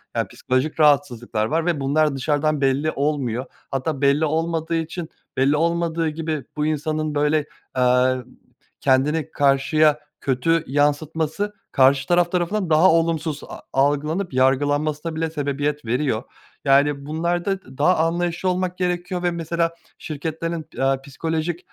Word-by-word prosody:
Eee, - - 0
psikolojik 130 +5 -2
rahatsızlıklar 130 -7 +2
var 160 +7 0
ve 170 -4 0
bunlar 145 +2 +2
dışarıdan 145 +2 0
belli 140 +3 +2
olmuyor 135 -4 -1 0.3
hatta 135 +1 -2
belli 140 +3 +3
olmadığı 165 +1 -1
için, 165 +1 -3 0.3
belli 135 +3 +3
olmadığı 165 0 0
gibi 155 -2 -3
bu 150 - +1
insanın, 155 0 -1
böyle, 150 +1 +2 0.3
eee, 125 0 +4 0.7
kendini 140 +3 +2
karşıya 150 +2 +3 0.2
kötü 150 +5 +1
yansıtması 155 +7 0 0.2
karşı 135 0 +4
taraf 175 0 +3
tarafından 180 +1 0
daha 160 +4 +6
olumsuz 165 -2 0
a - - -9
algılanıp 145 +6 +1
yargılanmasına 145 +4 +1
bile 160 0 -1
sebebiyet 145 -1 -2
veriyor. 125 0 0 0.4
Yani, 140 +1 +3
bunlarda 170 0 -2
daha 175 +6 +3
anlayışlı 170 +2 0
olmak 180 0 -1
gerekiyor 180 0 -2
ve 175 - +2
mesela 170 0 -1 0.3
şirketlerin, 160 +1 -4
eee, 135 0 +2
psikolojik, 160 +4 -3
155 Hz, 125 wpm, -22 LUFS, 140-165 Hz, 0.7 s, daha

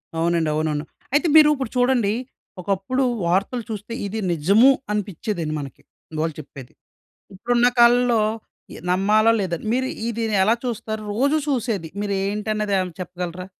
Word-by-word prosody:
అవునండి. 165 -1 +1
అవునవును. 155 -1 -1 0.3
అయితే 300 +4 +3
మీరు 305 -1 +8
ఇప్పుడు 260 -4 -5
చూడండి, 245 -5 +2 0.5
ఒకప్పుడు 200 +8 -1 0.2
వార్తలు 195 +7 0
చూస్తే 215 +1 -6
ఇది 215 +3 -4
నిజము 200 - +5 0.2
అనిపిచ్చేదండి 200 -5 -3
మనకి 140 -3 -9 0.4
వాళ్ళు 160 -1 -2
చెప్పేది. 135 -3 -13 0.6
ఇప్పుడున్న 240 +5 +2
కాలంలో 240 0 +5 0.5
ఇ - - -9
నమ్మాలా 210 +5 +3
లేదా? 185 -4 -1 0.2
మీరు 260 +2 0 0.2
ఈ - - -1
దీన్ని 220 -3 0
ఎలా 225 +4 +3
చూస్తారు? 220 -2 -4
రోజు 280 +8 +2
చూసేది. 230 - -1
మీరు 205 -1 -2
ఏంటన్నది 210 0 -2
ఏమైనా 185 -2 -2
చెప్పగలరా? 180 0 -6
210 Hz, 135 wpm, -22 LUFS, 180-235 Hz, 0.6 s, మీరు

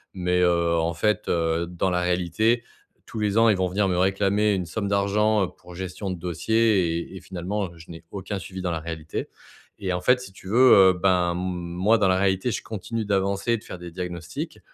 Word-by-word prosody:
mais 90 0 +1
heu, 85 -1 +2
en 85 +1 0
fait, 105 +6 0
heu, 85 0 0
dans 90 +2 -1
la 90 0 +1
réalité, 90 +7 +1 0.4
tous 115 - -8
les 105 0 0
ans, 115 0 +6
ils 100 - +3
vont 95 -1 +1
venir 100 +2 0
me 90 -1 0
réclamer 100 +2 +2
une 90 -2 -1
somme 100 +3 -3
d'argent 100 0 +2
pour 90 - -14
gestion 95 +2 -5
de 90 - -5
dossier, 90 0 +1
et 95 - -8
et - - -8
finalement, 95 0 -4
je 80 0 -15
n'ai 85 0 -10
aucun 100 0 -4
suivi 95 0 -7
dans 90 - -1
la 80 - -2
réalité, 80 -1 -5 0.5
et 95 -2 -2
en 90 0 -1
fait, 125 +6 +4
si 110 - -10
tu 95 - -14
veux, 125 +3 +6 0.2
heu, - - -1
ben, 90 -1 +2
moi, 90 +4 0
dans 100 -2 +2
la 95 0 +3
réalité, 95 +4 +1
je - - -3
continue 110 +1 -4
d'avancer 100 +3 0
et - - +2
de - - -14
faire 90 - -9
des 90 0 -8
diagnostics. 85 -2 -6
95 Hz, 215 wpm, -24 LUFS, 85-105 Hz, 0.5 s, ans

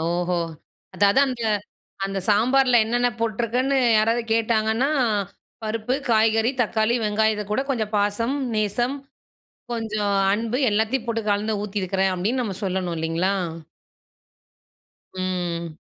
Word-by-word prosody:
ஓஹோ! 175 +2 0 0.6
அதாவது 200 +6 +4
அந்த 250 -3 -4 0.6
அந்த 195 0 -2
சாம்பார்ல 245 +3 +4
என்னென்ன 240 +2 +1
போட்டுருக்குன்னு 235 +4 0 0.2
யாராவது 230 +2 +2
கேட்டாங்கன்னா, 225 +2 +1 0.8
"பருப்பு, 220 +3 -1 0.2
காய்கறி, 225 +1 +3
தக்காளி, 220 +1 +1
வெங்காயத்துக்கூட 210 +2 0
கொஞ்சம் 220 -5 -2
பாசம், 205 +5 0 0.2
நேசம், 240 +6 0 0.8
கொஞ்சம் 215 -3 -1 0.2
அன்பு 230 +4 -1
எல்லாத்தையும் 220 +4 0
போட்டு 225 -1 -1
கலந்து 210 +1 0
ஊத்தியிருக்கிறேன்." 195 -2 -1
அப்டீன்னு 220 +9 0
நம்ம 195 -4 -4
சொல்லணும், 185 -2 -1
இல்லீங்களா? 165 +4 0 1.8
ம். 175 -3 -3
215 Hz, 100 wpm, -23 LUFS, 195-230 Hz, 1.8 s, அதாவது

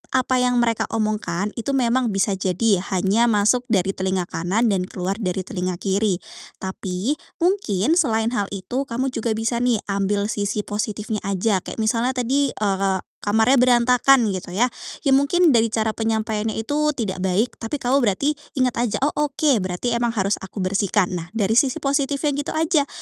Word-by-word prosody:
apa 255 0 +2
yang 250 0 +2
mereka 230 -2 0
omongkan, 210 -3 -1
itu 275 +4 -2
memang 250 -1 +2
bisa 195 +1 +1
jadi 195 +1 +1 0.2
hanya 200 +6 +2
masuk 230 +3 +2
dari 195 -5 +1
telinga 190 -1 -1
kanan 190 +7 0
dan 185 -2 -1
keluar 190 +3 -4
dari 185 -3 -2
telinga 185 -3 -3
kiri. 195 +2 0 0.5
Tapi, 190 - -3 0.2
mungkin 315 - +1
selain 225 -7 +1
hal 205 -5 -1
itu, 245 +9 -3
kamu 255 +3 -2
juga 225 -2 -2
bisa 225 +2 -1
nih, 240 -3 +1
ambil 200 +1 0
sisi 205 0 -2
positifnya 210 +1 -3
aja, 200 +1 +1
kayak - - -8
misalnya 230 +3 0
tadi, 265 +2 0
eee, 195 -2 0 0.2
kamarnya 220 +6 +3
berantakan, 250 -1 +4
gitu 185 -1 -6
ya. 245 +4 +2 0.3
Ya 280 - +2
mungkin 295 +5 +4
dari 230 -2 +4
cara 220 0 0
penyampaiannya 220 -1 -1
itu 295 +6 0
tidak 195 -5 -3
baik, 190 +6 0
tapi 225 +5 -4
kamu 270 0 +1
berarti 245 +5 +1 0.2
ingat 255 -3 +1
aja, 240 -3 0
"Oh, 290 - +2
oke, 295 -4 +1
berarti 185 +6 -2
emang 235 0 0
harus 200 -1 0
aku 190 0 -6
bersihkan." 195 0 +1
Nah, 165 - -8
dari 220 +1 +3
sisi 265 -3 -1
positifnya 280 +1 0
gitu 285 +1 -3
aja. 315 -2 +2
225 Hz, 170 wpm, -22 LUFS, 195-255 Hz, 0.5 s, berantakan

